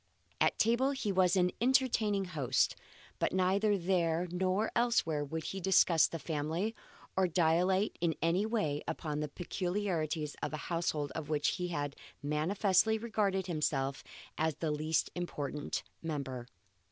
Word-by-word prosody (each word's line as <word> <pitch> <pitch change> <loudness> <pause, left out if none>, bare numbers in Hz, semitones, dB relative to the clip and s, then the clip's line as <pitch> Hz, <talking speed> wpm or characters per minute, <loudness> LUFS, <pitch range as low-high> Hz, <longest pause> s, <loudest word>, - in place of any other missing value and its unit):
At - - +3
table 240 +5 +3
he 220 -6 -2
was 185 -1 +3
an 180 -1 +3
entertaining 235 -6 +2
host; 140 -8 +1 0.4
but - - 0
neither 195 +3 +2
there 175 -2 +1
nor 185 +4 0
elsewhere 230 -11 +2
would 160 +3 -4
he 195 +3 -4
discuss 180 -3 +5
the 165 - -5
family, 160 +7 -2 0.4
or 190 -1 +3
dilate 180 +4 +2
in 165 -3 +1
any 165 +5 +2
way 210 -10 0
upon 150 -2 -3
the 150 - -1
peculiarities 175 -3 -2
of - - -3
a - - -2 0.2
household 155 -4 -1
of 155 -2 -5
which 150 -2 +2
he 180 -2 -2 0.5
manifestly 190 +8 +2
regarded 210 -4 0
himself 145 -5 -1 0.4
as 160 -1 +1
the 155 0 -2
least 155 +1 0
important 150 -5 -3 0.2
member. 135 -6 -4
175 Hz, 140 wpm, -33 LUFS, 155-195 Hz, 0.5 s, discuss